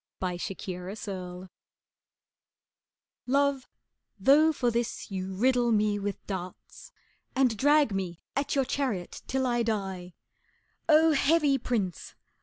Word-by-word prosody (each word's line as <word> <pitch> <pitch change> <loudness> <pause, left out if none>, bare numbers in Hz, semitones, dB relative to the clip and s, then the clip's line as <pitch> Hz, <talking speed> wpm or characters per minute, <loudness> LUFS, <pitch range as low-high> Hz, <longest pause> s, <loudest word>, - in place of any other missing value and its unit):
Four 180 -2 -2
Sonnets 190 +3 -6
I 180 -2 -6 1.8
Love, 280 0 +1 0.5
though 290 +10 +5
for 250 -5 0
this 235 -2 -3
you 190 0 -4
riddle 245 +2 +2
me 210 -1 +2
with 200 0 -4
darts, 185 -2 -7 0.4
And 260 -4 +3
drag 290 +2 +4
me 180 -3 -3 0.2
at 280 +1 -1
your 270 -1 +2
chariot 250 -10 -3
till 265 0 0
I 240 -1 +1
die, 195 -6 -3 0.7
Oh, 320 +1 +6
heavy 295 -1 +3
prince! 205 -8 -3
225 Hz, 115 wpm, -28 LUFS, 190-270 Hz, 1.8 s, Oh